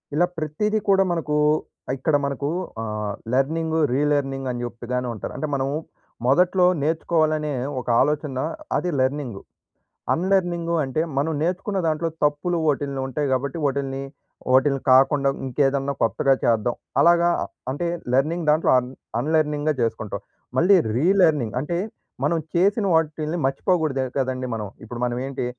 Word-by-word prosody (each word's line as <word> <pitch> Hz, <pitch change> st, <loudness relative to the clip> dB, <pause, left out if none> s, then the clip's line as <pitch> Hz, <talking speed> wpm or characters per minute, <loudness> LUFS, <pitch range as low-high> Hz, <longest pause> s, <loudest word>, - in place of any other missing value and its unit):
ఇలా 175 Hz, +3 st, +4 dB
ప్రతీదీ 210 Hz, +8 st, -1 dB
కూడా 195 Hz, 0 st, +5 dB
మనకూ, 150 Hz, -3 st, -1 dB, 0.6 s
ఇక్కడ 145 Hz, +3 st, +1 dB
మనకు 140 Hz, +1 st, -2 dB, 0.3 s
ఆహ్, 105 Hz, -2 st, -3 dB, 0.2 s
లర్నింగు, 160 Hz, +4 st, +1 dB
రిలర్నింగ్ 135 Hz, -2 st, 0 dB
అని 120 Hz, 0 st, -4 dB
జెపుతానే 120 Hz, +2 st, -4 dB
ఉంటారు. 110 Hz, -, -6 dB
అంటే 155 Hz, -, -2 dB
మనము 135 Hz, +1 st, -1 dB, 0.5 s
మొదట్లో 180 Hz, +5 st, +4 dB, 0.2 s
నేర్చుకోవాలనే 155 Hz, -1 st, +1 dB, 0.3 s
ఒక 125 Hz, -, -9 dB
ఆలోచన 145 Hz, -1 st, 0 dB, 0.4 s
అది 180 Hz, -, -1 dB
లర్నింగు. 130 Hz, -6 st, -1 dB, 0.7 s
అన్‌లర్నింగు 175 Hz, -2 st, 0 dB
అంటే 135 Hz, +4 st, -2 dB, 0.2 s
మనం 160 Hz, +3 st, 0 dB
నేర్చుకున్న 190 Hz, +3 st, -1 dB
దాంట్లో 160 Hz, +1 st, 0 dB, 0.2 s
తప్పులు 150 Hz, +4 st, +1 dB
ఓటిల్ని 140 Hz, -1 st, -2 dB
ఉంటాయి 145 Hz, +2 st, -2 dB
కాబట్టి 135 Hz, +4 st, -1 dB
ఓటిల్ని. 135 Hz, 0 st, -3 dB, 0.5 s
ఓటిల్ని 135 Hz, 0 st, +4 dB
కాకుండా 140 Hz, +1 st, +5 dB, 0.2 s
ఇంకేదన్నా 135 Hz, +1 st, +1 dB
కొత్తగా 135 Hz, +4 st, +3 dB
చేద్దాం. 115 Hz, +1 st, +2 dB, 0.3 s
అలాగా 170 Hz, +2 st, +5 dB, 0.4 s
అంటే 170 Hz, +6 st, -2 dB, 0.3 s
లెర్నింగ్ 155 Hz, +5 st, +1 dB
దాంట్లో 155 Hz, +2 st, +3 dB
అన్ 125 Hz, 0 st, -2 dB, 0.3 s
అన్‌లర్నింగ్‌గా 150 Hz, -1 st, +1 dB
చేసుకుంటాం. 110 Hz, -3 st, -2 dB, 0.4 s
మళ్ళీ 190 Hz, +7 st, +6 dB, 0.2 s
రిలర్నింగ్ 155 Hz, -, +3 dB
అంటే, 170 Hz, +4 st, -2 dB, 0.5 s
మనం 165 Hz, +3 st, +2 dB, 0.2 s
చేసిన 200 Hz, +4 st, +3 dB
వాటిల్ని 155 Hz, +1 st, 0 dB
మర్చిపోకూడదు 140 Hz, -2 st, 0 dB
కదండీ 130 Hz, -1 st, -1 dB
మనం. 105 Hz, -2 st, -4 dB, 0.2 s
ఇప్పుడు 120 Hz, +1 st, -7 dB
మనం 120 Hz, 0 st, -1 dB
ఏంటి 135 Hz, -2 st, -4 dB
145 Hz, 125 wpm, -23 LUFS, 130-165 Hz, 0.7 s, మళ్ళీ